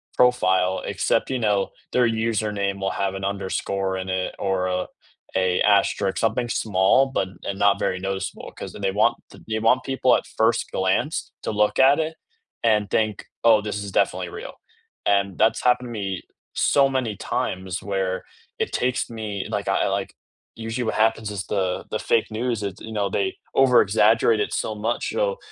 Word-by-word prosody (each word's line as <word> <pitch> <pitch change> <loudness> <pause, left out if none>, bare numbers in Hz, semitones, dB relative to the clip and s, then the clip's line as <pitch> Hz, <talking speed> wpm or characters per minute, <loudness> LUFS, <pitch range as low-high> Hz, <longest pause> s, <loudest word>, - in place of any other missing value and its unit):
profile 95 -7 +3
except, - - 0
you 130 -1 -1
know, 105 -3 +1 0.2
their 125 -1 +3
username 105 -3 -1
will 95 0 -1
have 95 -1 -2
an 95 0 -4
underscore 95 -1 -2
in 95 0 -5
it 95 0 -2
or, 95 -1 0
uh, 90 0 -1 0.5
a 95 -1 +2
asterisk, 100 -1 +2
something 115 +2 0
small 105 +4 +3
but 130 -8 -1 0.2
and 100 - -4
not 100 -1 +4
very 90 - -1
noticeable 95 0 -4
'cause - - -7
then - - -9
they 95 -1 +1
want 105 +2 +2
th - - -15
they 110 0 -1
want 115 +4 +3
people 130 -1 +2
at - - -2
first 115 +1 +1
glance 95 +11 0
to - - -3
look 105 0 +1
at 135 +3 +6
it 160 0 -2 0.5
and 105 -3 +3
think, 110 -1 0 0.2
"Oh, 115 -2 +6
this 105 -1 -4
is 100 - -6
definitely 90 -1 +1
real." - - -8 0.5
And 100 -2 +2
that's 110 +1 +3
happened 125 0 +3
to - - -8
me 100 -4 -3 0.3
so 140 -1 +4
many 130 -5 -1
times 95 -1 -3
where 95 -2 -2 0.4
it 450 - -1
takes 125 0 0
me 110 -4 -4
like, - - -3
I, - - +2
like - - -2 0.4
usually 115 +2 -3
what 110 - -1
happens 110 -1 +2
is 100 -2 -4
the 95 -3 -1
the 110 - -2
fake 115 -1 +1
news, 115 0 -2
it's 100 -1 -4
you 110 - -8
know, 100 -2 0
they 95 0 -1 0.2
over-exaggerate 115 -3 +4
it - - -1
so 110 - -2
much, 110 +3 -2
you - - -5
know? - - +1
105 Hz, 185 wpm, -23 LUFS, 95-115 Hz, 0.5 s, at